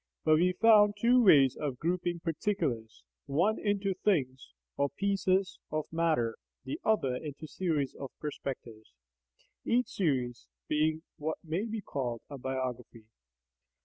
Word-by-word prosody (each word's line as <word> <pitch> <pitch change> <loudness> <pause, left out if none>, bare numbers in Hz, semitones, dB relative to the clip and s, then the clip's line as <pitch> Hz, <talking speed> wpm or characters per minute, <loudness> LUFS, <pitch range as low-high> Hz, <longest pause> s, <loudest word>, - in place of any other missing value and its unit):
But 155 -1 +5
we 180 +3 +3
found 210 0 +6
two 245 +3 +4
ways 140 - +6
of 140 -4 -3
grouping 175 +2 -1
particulars, 135 - -2 0.2
one 175 +10 +2
into 200 -1 0
"things" 130 - -1 0.2
or 140 0 +1
"pieces 190 +2 0
of 155 0 -2
matter," 155 -9 +1 0.3
the 130 - -5
other 135 -13 +2
into 150 +2 -7
series 155 -3 -1
of 135 - -7
"perspectives," 120 - -7 0.7
each 245 +1 +1
series 135 - -1 0.2
being 155 +1 +1
what 155 +1 -3
may 170 +6 -2
be 220 -1 -4
called 125 - -3
a 140 - -7
"biography." 125 -3 -4
155 Hz, 130 wpm, -31 LUFS, 130-195 Hz, 0.7 s, found